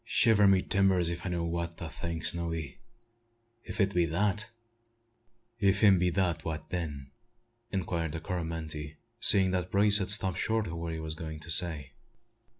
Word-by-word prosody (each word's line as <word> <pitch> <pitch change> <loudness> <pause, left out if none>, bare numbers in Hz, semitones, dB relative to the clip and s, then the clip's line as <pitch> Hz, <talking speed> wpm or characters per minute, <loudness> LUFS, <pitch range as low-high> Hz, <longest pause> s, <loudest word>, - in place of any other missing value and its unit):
"Shiver 110 -3 +3
my 95 -1 +3
timbers 95 -3 +1
if 85 +2 -6
I - - -2
know 85 -1 -3
what 85 0 -4
to 85 - -7
think, 85 0 -6
Snowy! 85 -3 -3 0.8
If - - -9
it 100 -1 +1
be 90 -1 +2
that 100 +6 -2 0.5
" 115 0 -42
"Ef 100 +1 +1
'im 100 -4 +5
be 90 0 +1
dat, 85 -2 -2
wha' 80 -1 -4
den?" 75 -4 -7 0.6
inquired 85 -4 -3
the 80 - -5
Coromantee, 80 -4 -6 0.2
seeing 95 -4 +8
that 90 -1 -3
Brace 100 +1 +6
had 95 - -3
stopped 95 -3 +2
short 110 -1 -1
in 85 - -7
what 85 0 -5
he 80 - -6
was 80 0 -5
going 80 -1 -8
to 80 - -4
say. 80 -5 +1
85 Hz, 175 wpm, -28 LUFS, 80-100 Hz, 0.8 s, seeing